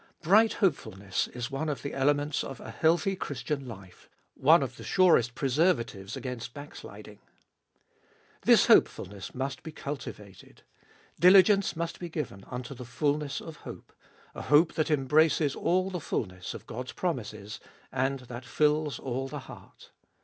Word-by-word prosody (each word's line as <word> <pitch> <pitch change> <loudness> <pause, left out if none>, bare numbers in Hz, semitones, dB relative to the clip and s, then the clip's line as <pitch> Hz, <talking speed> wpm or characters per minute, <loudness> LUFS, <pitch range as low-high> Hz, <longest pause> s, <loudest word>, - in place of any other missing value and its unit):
Bright 215 +7 +5
hopefulness 100 - -1
is 125 +3 -6
one 140 +3 -2
of 140 -5 -4
the 140 - -4
elements 145 +2 +1
of 135 - -7
a - - -8
healthy 170 +4 +2
Christian 140 -3 -4
life 100 -6 -12 0.2
— - - -47
one - - +5
of - - -6
the - - -10
surest 145 -10 +3
preserva 140 0 +2
tives 100 -3 -9
against 125 -2 -6
backsliding. 105 -7 -10 1.2
This - - +6
hopefulness 95 -1 +2
must 135 +1 -3
be 160 - -8
cultivated; 105 - -8 0.6
diligence 195 +3 +6
must 170 0 -4
be 175 - -6
given 145 - -5
unto 125 +1 -6
the 125 -1 -9
fulness 145 +4 -1
of 160 -2 -9
hope - - -11 0.2
— - - -28
a - - -7
hope 155 +3 +4
that 155 - 0
embraces 150 +1 +3
all 185 +2 +1
the 180 -3 -4
fulness 90 -9 -4
of - - -10
God's 125 +3 -6
promises, 110 - -4 0.3
and 135 +1 -1
that 125 0 -8
fills 150 0 +1
all 130 +1 -3
the - - -6
heart. - - -15
140 Hz, 155 wpm, -29 LUFS, 120-160 Hz, 1.2 s, This